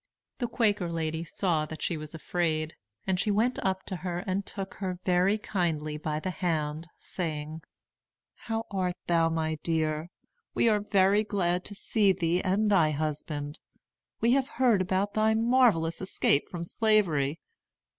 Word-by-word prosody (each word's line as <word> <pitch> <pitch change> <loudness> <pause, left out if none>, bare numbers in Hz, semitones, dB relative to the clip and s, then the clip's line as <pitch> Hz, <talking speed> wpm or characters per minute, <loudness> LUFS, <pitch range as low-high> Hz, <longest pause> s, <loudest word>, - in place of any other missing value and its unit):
The 240 - 0
Quaker 205 -7 +1
lady 160 0 -2
saw 165 -2 0
that 155 +1 -7
she 170 - 0
was 155 +1 -7
afraid, 160 -1 -1 0.3
and 190 -1 0
she 210 - +1
went 225 +5 +2
up 190 0 0
to 185 - -4
her 175 -1 -3
and 190 +1 -1
took 195 -1 -6
her 185 -2 -3
very 185 +3 +3
kindly 165 -8 -2
by 150 0 -2
the 185 +4 -3
hand, 155 -2 -2
saying: 155 -2 -4 0.7
"How 225 0 -4
art 185 -2 -1
thou, 165 -1 +3
my 160 -1 -1
dear? 155 0 -1 0.5
We - - +3
are 215 -2 +4
very 200 0 +3
glad 180 -4 0
to 205 - -6
see 200 -1 +2
thee 170 +1 0
and 205 +3 +1
thy 170 -6 +5
husband. 150 0 -3 0.6
We 230 - +3
have 270 0 +3
heard 240 -7 +4
about 190 +2 0
thy 220 0 +3
marvellous 225 -9 +3
escape 185 -6 +1
from 175 -2 -5
Slavery. 170 -8 +2
180 Hz, 155 wpm, -28 LUFS, 160-205 Hz, 0.7 s, thy